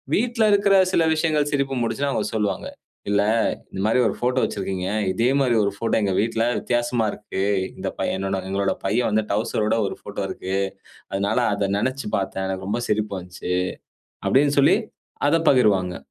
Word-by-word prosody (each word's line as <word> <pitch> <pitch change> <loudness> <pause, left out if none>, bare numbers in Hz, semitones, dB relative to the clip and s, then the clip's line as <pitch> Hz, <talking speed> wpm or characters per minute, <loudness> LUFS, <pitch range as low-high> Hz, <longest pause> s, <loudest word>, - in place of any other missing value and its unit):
வீட்ல 235 0 +1
இருக்கிற 200 0 +4 0.2
சில 165 - +4
விஷயங்கள் 155 -2 +1
சிரிப்பு 140 -2 0
மூட்டுச்சுனா 120 +4 -1
அவுங்க - - -1
சொல்லுவாங்க, 105 -2 -1 0.4
"இல்ல, 100 0 +3 0.5
இந்த 95 - -4
மாரி 110 +4 +3
ஒரு 100 - -2
ஃபோட்டோ 125 +1 +1
வெச்சிருக்கீங்க. 95 -2 -2 0.2
இதே 115 +6 +1
மாரி 125 -3 +2
ஒரு 100 - +1
ஃபோட்டோ 115 - 0
எங்க 100 -2 +1
வீட்ல 115 +1 0
வித்தியாசமா 120 -2 0
இருக்கு. 100 -2 -4 0.3
இந்த - - -3
பையன 95 0 -1
நாங்க 95 0 -5
எங்களோட 100 0 0
பையன் 120 +2 +1
வந்து 110 0 +1
டவுசரோட 110 0 0
ஒரு - - -6
ஃபோட்டோ - - -5
இருக்கு. 95 +1 -3 0.6
அதனால 100 +3 0 0.2
அத 100 -1 -1
நெனச்சு 130 +4 -2
பார்த்தேன். 95 -1 -3
எனக்கு 95 0 -4
ரொம்ப 120 - -1
சிரிப்பு 105 -1 0
வந்துச்சு." 90 0 -5 0.7
அப்படீன்னு 145 +2 +3
சொல்லி 140 - +5 0.5
அதப் 165 +1 +1
பகிர்வாங்க. 100 -9 +3
110 Hz, 165 wpm, -23 LUFS, 100-130 Hz, 0.7 s, சொல்லி